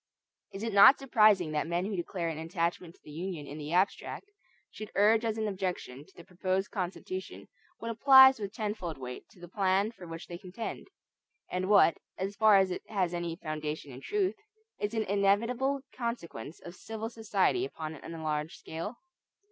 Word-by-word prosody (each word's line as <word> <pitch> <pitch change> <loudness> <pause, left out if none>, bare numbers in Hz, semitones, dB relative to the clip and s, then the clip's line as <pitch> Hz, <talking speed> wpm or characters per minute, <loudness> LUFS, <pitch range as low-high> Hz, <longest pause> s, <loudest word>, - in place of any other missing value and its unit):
Is 195 +2 -7
it 225 -2 -2
not 200 +7 +9
surprising 215 - +4
that 150 +1 -1
men 175 +2 -1
who 205 0 -3
declare 175 -1 -3
an 160 -1 -3
attachment 170 +1 -2
to - - -28
the 150 - -12
Union 165 -1 -5
in 145 +2 -8
the 150 +1 -6
abstract, 195 - 0 0.4
should 215 - -8
urge 215 +3 +4
as 225 -1 -1
an 220 -1 -1
objection 185 -9 -4
to 190 - -23
the 170 - -12
proposed 185 +2 -2
Constitution 185 -1 -5 0.3
what 230 - -4
applies 265 +2 +8
with 200 -2 -4
tenfold 210 -7 -4
weight 125 -1 -8
to - - -20
the 175 - -10
plan 195 +3 +1
for 185 -7 -12
which 165 0 -7
they 175 0 -8
contend; 195 +4 -6 0.6
and 185 +1 -2
what, 200 -5 +5 0.2
as 195 +2 -3
far 215 -2 +6
as 190 -1 +3
it - - -3
has 185 -5 0
any 170 -1 -3
foundation 155 -3 -5
in 130 +1 -10
truth, 395 - 0 0.5
is 205 +2 -2
an 220 - +1
inevitable 230 +8 +1
consequence 175 - -5
of 175 - -9
civil 220 +4 -6
society 220 - +1
upon 160 - -5
an 155 - -12
enlarged 155 -1 -3
scale? 165 +9 -6
190 Hz, 180 wpm, -30 LUFS, 170-220 Hz, 0.6 s, not